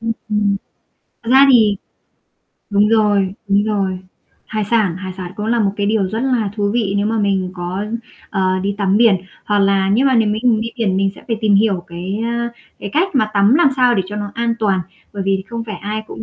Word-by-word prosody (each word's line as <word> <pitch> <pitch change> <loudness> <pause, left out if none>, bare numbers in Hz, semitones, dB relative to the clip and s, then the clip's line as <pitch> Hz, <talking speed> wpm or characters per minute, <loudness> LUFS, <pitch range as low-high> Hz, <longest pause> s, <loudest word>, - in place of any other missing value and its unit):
Ừm, 225 0 -1 0.2
ừm. 205 -1 +1 0.7
Thật 230 - -5
ra 270 +1 +7
thì 220 -5 +5 1.0
đúng 205 +1 +3
rồi, 205 -4 +2 0.2
đúng 200 +1 +3
rồi. 195 -3 -1 0.5
Hải 215 -2 -2
sản 205 -5 +1
hải 185 0 -6
sản 180 -1 -7
cũng 210 +1 -4
là 235 0 +1
một 200 - +2
cái 205 - -1
điều 205 -2 +1
rất 220 +4 -3
là 245 -6 0
thú 205 -1 0
vị 215 -4 0
nếu 205 +1 +1
mà 225 +1 0
mình 195 -3 0
có, 180 +2 -4 0.5
ờ, 185 -1 0
đi 200 +1 -1
tắm 195 -1 +2
biển, 225 -3 +5 0.3
hoặc 205 -1 +1
là 195 -1 +2
nếu 245 +7 +3
mà 265 - +3
nếu 225 -3 +3
mình 220 +1 +1
đi 230 - -3
biển 205 -6 0
mình 195 0 +1
sẽ - - -15
phải 225 - 0
tìm 215 -2 +3
hiểu 195 -4 +2
cái, 180 +4 -5
ơ, 235 0 -1 0.3
cái 200 - -6
cách 350 +5 +2
mà 215 -5 +2
tắm 200 +4 +4
làm 335 -1 +5
sao 250 -2 +4
để 195 - +1
cho 205 - -7
nó 205 -1 -4
an 235 0 0
toàn. 200 -4 +1 0.3
Bởi 200 -2 -4
vì 195 0 0
không 230 -1 -5
phải 215 -2 -6
ai 215 +1 -4
cũng - - -8
210 Hz, 230 wpm, -18 LUFS, 195-225 Hz, 1.0 s, ra